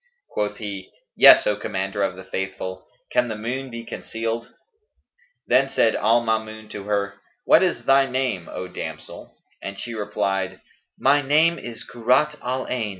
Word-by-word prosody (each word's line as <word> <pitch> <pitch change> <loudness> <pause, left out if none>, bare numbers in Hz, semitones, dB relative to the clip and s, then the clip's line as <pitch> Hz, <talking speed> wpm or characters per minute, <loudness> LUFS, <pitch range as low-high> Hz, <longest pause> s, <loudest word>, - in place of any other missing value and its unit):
Quoth 105 0 -2
he, 100 -3 -6 0.2
"Yes, - - +9
O 105 - +2
Commander 100 -1 -3
of 95 -2 0
the 95 - -10
Faithful, 95 -1 -5 0.2
can - - +2
the 110 - -4
moon 125 +5 -4
be 115 -1 -7
concealed?" 115 +1 -4 0.9
Then 135 +2 +3
said 115 -4 +2
al 115 +3 +3
Maamun 110 -1 -3
to 100 -1 -7
her, 100 -1 -2 0.2
"What - - +6
is - - 0
thy 135 0 +5
name, 125 -10 -2
O 90 - -5
damsel?"; 90 - -8 0.2
and 100 0 -6
she 120 +3 -5
replied, 95 -3 -2 0.4
"My 140 +2 +4
name 155 +5 +3
is 120 -2 -7
Kurrat 130 +6 +2
al 130 +1 -2
Ayn. 115 -4 -2
110 Hz, 155 wpm, -23 LUFS, 100-125 Hz, 0.9 s, Yes